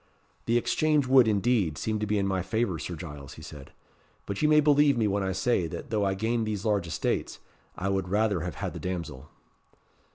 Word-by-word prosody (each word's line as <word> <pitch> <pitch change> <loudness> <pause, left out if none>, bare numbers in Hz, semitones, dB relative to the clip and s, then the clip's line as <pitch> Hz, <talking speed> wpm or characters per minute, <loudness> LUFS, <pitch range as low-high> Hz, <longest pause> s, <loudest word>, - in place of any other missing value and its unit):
"The 115 +1 +3
exchange 145 +5 +2
would, 130 -2 +6
indeed, 105 -6 +1
seem 110 -1 -2
to 105 - -2
be 105 +1 +1
in 100 - +1
my 95 -1 0
favour, 95 -2 -1
Sir 90 - -5
Giles," 75 -4 -9
he 80 - -12
said; 75 -4 -11 0.5
"but 100 - -4
you 150 - +3
may 150 0 +6
believe 145 -2 +4
me 110 -2 +2
when 100 0 0
I 95 0 -1
say, 95 -1 +1
that 130 - -8
though 105 -2 +1
I 95 0 0
gain 115 +3 0
these 105 -2 -3
large 100 -5 +1
estates, 80 - -2 0.4
I 95 - -2
would 95 -2 -1
rather 105 -1 +1
have 85 -2 -5
had - - -4
the - - -7
damsel." 85 -6 -5
100 Hz, 215 wpm, -27 LUFS, 90-120 Hz, 0.5 s, would